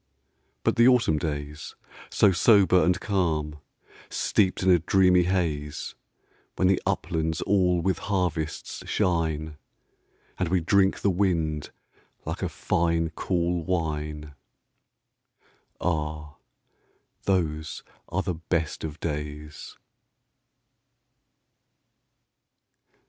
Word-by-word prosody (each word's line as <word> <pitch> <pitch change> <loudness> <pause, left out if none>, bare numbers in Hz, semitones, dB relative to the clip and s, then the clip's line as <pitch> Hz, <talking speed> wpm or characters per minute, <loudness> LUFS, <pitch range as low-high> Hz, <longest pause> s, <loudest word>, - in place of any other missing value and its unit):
But - - +1
the 120 +1 +6
autumn 120 -12 +4
days, 75 -1 -5 0.3
so 100 - +4
sober 95 -1 +5
and 90 +3 +2
calm, 80 -7 -1 0.5
Steeped 95 -2 +1
in 95 - +5
a 90 - +5
dreamy 90 +1 +4
haze, 80 -6 -2 0.6
When 95 - +2
the 95 0 +2
uplands 80 -1 -1
all 90 -3 +2
with 95 -3 0
harvests 90 -6 -2
shine, 80 -3 0 0.8
And 90 - 0
we 90 +1 +2
drink 95 +3 +2
the 100 - +2
wind 85 -5 0 0.6
like - - -4
a - - -1
fine 85 -1 0
cool 85 -1 -1
wine 75 -4 -3 1.5
Ah, 75 -3 -3 0.9
those 80 -4 -1 0.3
are 95 +3 -1
the 90 - -2
best 80 -1 -2
of 80 -1 -6
days! 75 -1 -6
85 Hz, 95 wpm, -26 LUFS, 75-95 Hz, 1.5 s, the